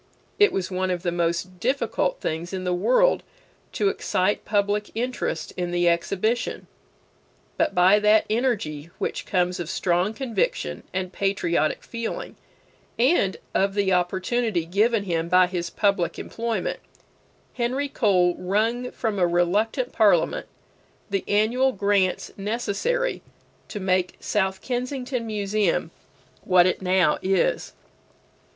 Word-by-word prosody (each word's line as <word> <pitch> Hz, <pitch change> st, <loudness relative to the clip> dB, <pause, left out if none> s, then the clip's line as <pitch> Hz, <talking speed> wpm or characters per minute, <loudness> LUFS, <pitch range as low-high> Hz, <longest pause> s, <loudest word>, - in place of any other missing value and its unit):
It 415 Hz, -, +6 dB
was 190 Hz, 0 st, -3 dB
one 185 Hz, 0 st, -1 dB
of 180 Hz, -1 st, -2 dB
the 175 Hz, -, 0 dB
most 175 Hz, +1 st, -2 dB
difficult 280 Hz, -, 0 dB
things 165 Hz, +3 st, -3 dB
in 185 Hz, -1 st, -3 dB
the 180 Hz, -1 st, 0 dB
world -, -, +3 dB, 0.5 s
to 205 Hz, -2 st, +2 dB
excite 190 Hz, +1 st, 0 dB
public 205 Hz, 0 st, 0 dB
interest 240 Hz, -8 st, -3 dB
in 175 Hz, -1 st, -2 dB
the 175 Hz, 0 st, +1 dB
exhibition. 195 Hz, +7 st, 0 dB, 0.9 s
But -, -, 0 dB
by 185 Hz, +3 st, +6 dB
that 210 Hz, +1 st, +4 dB
energy 205 Hz, -, -1 dB
which -, -, -3 dB
comes 180 Hz, -1 st, 0 dB
of 170 Hz, -2 st, -4 dB
strong 180 Hz, +5 st, 0 dB
conviction 265 Hz, -, -2 dB
and 185 Hz, 0 st, -3 dB
patriotic 175 Hz, -5 st, 0 dB
feeling, 230 Hz, -, -5 dB, 0.6 s
and 240 Hz, -, +2 dB, 0.2 s
of 195 Hz, 0 st, +1 dB
the 200 Hz, -2 st, +2 dB
opportunity 185 Hz, +2 st, 0 dB
given 210 Hz, +5 st, +2 dB
him 170 Hz, -3 st, -2 dB
by 180 Hz, +1 st, +6 dB
his 175 Hz, -1 st, -3 dB
public 195 Hz, -2 st, 0 dB
employment, 230 Hz, -4 st, -3 dB, 0.7 s
Henry 260 Hz, +4 st, -1 dB
Cole 185 Hz, -9 st, +2 dB
wrung 225 Hz, +7 st, 0 dB
from 220 Hz, -4 st, -3 dB
a 175 Hz, -, +4 dB
reluctant 205 Hz, +9 st, +1 dB
Parliament 200 Hz, -7 st, +2 dB, 0.6 s
the 195 Hz, -1 st, 0 dB
annual 235 Hz, +6 st, +2 dB
grants 200 Hz, -2 st, +1 dB
necessary 240 Hz, -, -1 dB, 0.5 s
to 210 Hz, -, -6 dB
make 185 Hz, -1 st, 0 dB
South 190 Hz, -2 st, -1 dB
Kensington 250 Hz, -1 st, -3 dB
Museum 205 Hz, -5 st, 0 dB, 0.5 s
what 180 Hz, -2 st, +5 dB
it 185 Hz, -, 0 dB
now 185 Hz, -4 st, +2 dB
is. 195 Hz, -, 0 dB
195 Hz, 125 wpm, -24 LUFS, 180-230 Hz, 0.9 s, It